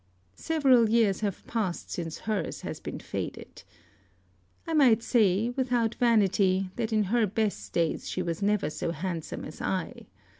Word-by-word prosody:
Several 265 Hz, -8 st, +4 dB
years 220 Hz, -4 st, +3 dB
have 205 Hz, -3 st, -3 dB
passed 210 Hz, -7 st, -3 dB
since 165 Hz, -2 st, -5 dB
hers 215 Hz, -2 st, -2 dB
has -, -, -6 dB
been -, -, -6 dB
faded. -, -, -6 dB, 1.0 s
I 325 Hz, -, -3 dB
might 250 Hz, -7 st, +5 dB
say, 220 Hz, -2 st, +3 dB
without 245 Hz, -3 st, 0 dB
vanity, 195 Hz, -5 st, +2 dB
that 230 Hz, -2 st, -2 dB
in 215 Hz, -1 st, +3 dB
her 220 Hz, +3 st, +2 dB
best 215 Hz, +1 st, -2 dB
days 165 Hz, -2 st, -1 dB
she 185 Hz, -, -2 dB
was 170 Hz, 0 st, -3 dB
never 200 Hz, -7 st, +1 dB
so -, -, -3 dB
handsome 170 Hz, 0 st, -4 dB
as -, -, -9 dB
I. -, -, -3 dB
215 Hz, 150 wpm, -28 LUFS, 185-235 Hz, 1.0 s, might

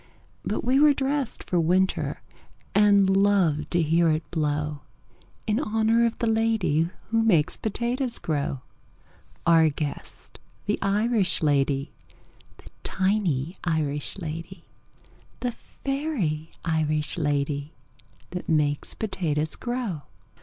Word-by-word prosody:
But -, -, -2 dB
we 255 Hz, +3 st, +3 dB
were 295 Hz, -1 st, +6 dB
dressed 270 Hz, -2 st, -1 dB
for 180 Hz, -, 0 dB
winter, 185 Hz, +3 st, +1 dB, 0.5 s
And 200 Hz, -1 st, +5 dB
loved 190 Hz, -6 st, +3 dB
to 175 Hz, -1 st, +2 dB
hear 165 Hz, +2 st, +3 dB
it 155 Hz, +1 st, -1 dB
blow 150 Hz, -2 st, -1 dB, 0.7 s
In 215 Hz, +2 st, +1 dB
honor 225 Hz, -2 st, +2 dB
of 230 Hz, -, -4 dB
the 235 Hz, -, -1 dB
lady 220 Hz, -8 st, +2 dB, 0.2 s
Who 225 Hz, 0 st, +3 dB
makes 175 Hz, -10 st, +3 dB
potatoes 240 Hz, +3 st, -2 dB
grow 140 Hz, -4 st, -2 dB, 0.8 s
Our 165 Hz, -1 st, +6 dB
guest, 145 Hz, 0 st, -6 dB, 0.3 s
the 210 Hz, -, 0 dB
Irish 205 Hz, -1 st, +1 dB
lady, 140 Hz, -2 st, +1 dB, 0.7 s
The -, -, -16 dB
tiny 185 Hz, -6 st, 0 dB
Irish 150 Hz, -3 st, -1 dB
lady, 165 Hz, +1 st, -6 dB, 0.8 s
The 245 Hz, -, 0 dB
fairy 235 Hz, -, -3 dB, 0.2 s
Irish 155 Hz, -1 st, 0 dB
lady 145 Hz, 0 st, -1 dB, 0.6 s
That 180 Hz, 0 st, -5 dB
makes 150 Hz, -2 st, +1 dB
potatoes 160 Hz, -7 st, -1 dB
grow. 240 Hz, -, -3 dB
175 Hz, 110 wpm, -26 LUFS, 155-220 Hz, 0.8 s, were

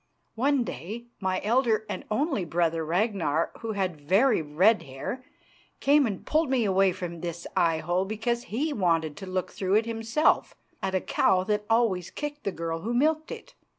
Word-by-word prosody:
One 270 Hz, +2 st, +2 dB
day 215 Hz, -, -6 dB
my 185 Hz, -1 st, 0 dB
elder 225 Hz, -1 st, +2 dB
and -, -, -5 dB
only 270 Hz, -, 0 dB
brother, 165 Hz, -1 st, 0 dB
Ragnar, 170 Hz, -3 st, 0 dB
who 225 Hz, -1 st, -4 dB
had 185 Hz, -6 st, -2 dB
very 200 Hz, -, +3 dB
red 180 Hz, +9 st, +3 dB
hair, 135 Hz, -, -6 dB, 0.6 s
came 285 Hz, -1 st, +4 dB
and 200 Hz, -4 st, -5 dB
pulled 315 Hz, -1 st, +1 dB
me 255 Hz, -4 st, +2 dB
away 195 Hz, -1 st, +3 dB
from 175 Hz, -2 st, -6 dB
this 170 Hz, 0 st, -5 dB
eyehole 170 Hz, +2 st, +1 dB
because 235 Hz, +4 st, -2 dB
he 290 Hz, +8 st, -2 dB
wanted 165 Hz, -, +1 dB
to 195 Hz, -, -8 dB
look 185 Hz, 0 st, -2 dB
through 190 Hz, 0 st, 0 dB
it 220 Hz, +1 st, +3 dB
himself 230 Hz, +6 st, +1 dB, 0.3 s
at 190 Hz, 0 st, -1 dB
a 185 Hz, -, +1 dB
cow 185 Hz, -2 st, +2 dB
that 210 Hz, +1 st, -1 dB
always 225 Hz, -6 st, +2 dB
kicked 295 Hz, -1 st, -6 dB
the 200 Hz, -, 0 dB
girl 165 Hz, -1 st, -3 dB
who 230 Hz, +7 st, -3 dB
milked 310 Hz, +4 st, +1 dB
it. -, -, -9 dB
200 Hz, 175 wpm, -27 LUFS, 175-235 Hz, 0.6 s, came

